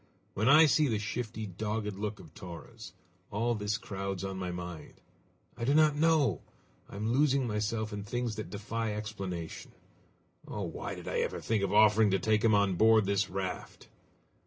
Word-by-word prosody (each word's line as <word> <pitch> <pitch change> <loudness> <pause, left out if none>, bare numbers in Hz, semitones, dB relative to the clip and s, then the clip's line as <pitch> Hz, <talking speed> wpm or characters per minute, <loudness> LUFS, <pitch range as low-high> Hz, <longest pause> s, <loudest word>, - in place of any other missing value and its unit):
When 110 +6 +1
I 155 +3 +8
see 150 0 +3
the 110 -4 0
shifty, 110 +1 -4
dogged 105 +2 -3
look 105 +1 -4
of 80 -2 -14
Torres, 90 -4 -10 0.4
all 115 +4 0
this 105 -1 -1
crowds 95 -3 -5
on 95 0 -4
my 90 -1 -3
mind. 90 -2 -7 0.6
I - - -6
do 140 +5 +2
not 155 -1 +5
know! 150 - +3 0.5
I - - -10
am 110 +3 -1
losing 140 -1 +3
myself 110 0 -2
in 100 -1 -4
things 120 +1 -3
that 110 - -5
defy 105 +1 -3
explanation! 95 -6 -6 0.7
Oh! 105 - -4
why 85 -3 -5
did - - -10
I - - -1
ever - - -1
think 110 -2 0
of 100 -1 0
offering 105 0 +5
to 95 - +2
take 110 +2 +1
him 110 -2 +5
on 100 -3 +2
board 110 0 +5
this 100 +1 +1
raft?" 95 -1 -5
105 Hz, 180 wpm, -31 LUFS, 100-115 Hz, 0.7 s, I